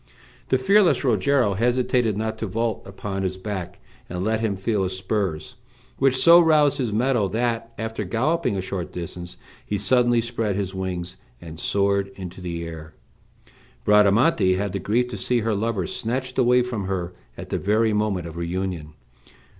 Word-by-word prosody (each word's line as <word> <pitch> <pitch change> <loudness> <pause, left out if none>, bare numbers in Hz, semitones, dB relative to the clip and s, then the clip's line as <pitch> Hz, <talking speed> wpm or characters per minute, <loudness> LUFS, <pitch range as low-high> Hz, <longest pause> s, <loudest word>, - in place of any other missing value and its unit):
The 130 - +4
fearless 195 +8 +4
Rogero 120 -1 +2
hesitated 120 0 +1
not 110 0 -3
to 110 - -2
vault 115 +3 -1
upon 95 0 -5
his 95 -1 -2
back, 95 -3 -5 0.3
and 90 +1 -3
let 110 +2 +1
him 110 -3 -1
feel 100 +2 -1
his 95 0 -2
spurs, 95 -5 -3 0.4
which 135 -1 +3
so 170 +5 +8
roused 155 -4 +4
his 120 -5 -1
mettle 115 -2 +1
that, 115 +1 -1
after 110 -1 -3
galloping 130 - 0
a - - -1
short 95 -1 -5
distance, 90 0 -7 0.3
he 105 - -2
suddenly 120 +4 +3
spread 115 -3 -2
his 100 -1 -3
wings, 90 -1 -4 0.2
and 80 +2 -10
soared 100 0 +1
into 95 -1 -8
the 85 -2 -4
air. 80 -1 -9 0.9
Bradamante 105 - +4
had 100 +1 -2
the 100 - -3
grief 110 +6 +1
to - - -5
see 125 -2 0
her 110 0 0
lover 105 -2 -1
snatched 130 +6 -3
away 125 0 +4
from 115 -5 -4
her 90 -2 -3 0.2
at - - -8
the - - 0
very 110 +2 +2
moment 105 -4 0
of 85 0 -8
reunion. 85 -3 -3
105 Hz, 170 wpm, -23 LUFS, 95-120 Hz, 0.9 s, so